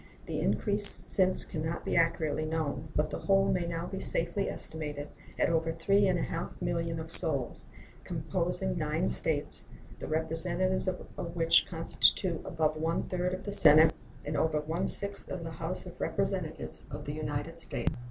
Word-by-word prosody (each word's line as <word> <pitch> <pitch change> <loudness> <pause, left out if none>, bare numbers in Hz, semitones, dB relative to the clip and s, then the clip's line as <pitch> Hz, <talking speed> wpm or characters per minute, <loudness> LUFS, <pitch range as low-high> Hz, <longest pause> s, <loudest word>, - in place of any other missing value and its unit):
The - - -4
increase 205 -1 +4
since 185 -1 +1
can 155 -3 -5
not 160 +1 -4
be - - -2
accurately 165 -2 0
known, 155 -1 -3
but 150 +1 0
the - - -4
whole 195 -1 +2
may 175 -2 -1
now 170 0 -4
be 190 +1 -6
safely 175 +2 +2
estimated 150 -2 -5 0.3
at - - +2
over 165 -1 0
three 195 +5 +2
and 185 -1 +1
a 165 - -2
half 165 - -5
millions 165 -1 -3
of 160 0 -7
souls, 140 -6 -4 0.4
composing 65 - -3
nine 65 - -1
States, 60 0 +3 0.3
the - - -7
representatives 170 +4 -2
of 175 -2 -6
which 165 -1 +3
constitute 170 +1 +3
above 155 -2 -1
one 165 +2 -1
third 180 0 -2
of 185 - -10
the 205 - -5
Senate 155 -4 +7 0.3
and 150 +1 -4
over 155 0 0
one 160 +4 -3
sixth 200 0 +4
of 180 -2 -5
the 165 - -7
House 160 - -6
of - - -11
Representatives - - -4
of - - -8
the - - -5
United - - -4
States. - - +3
165 Hz, 170 wpm, -29 LUFS, 155-185 Hz, 0.4 s, Senate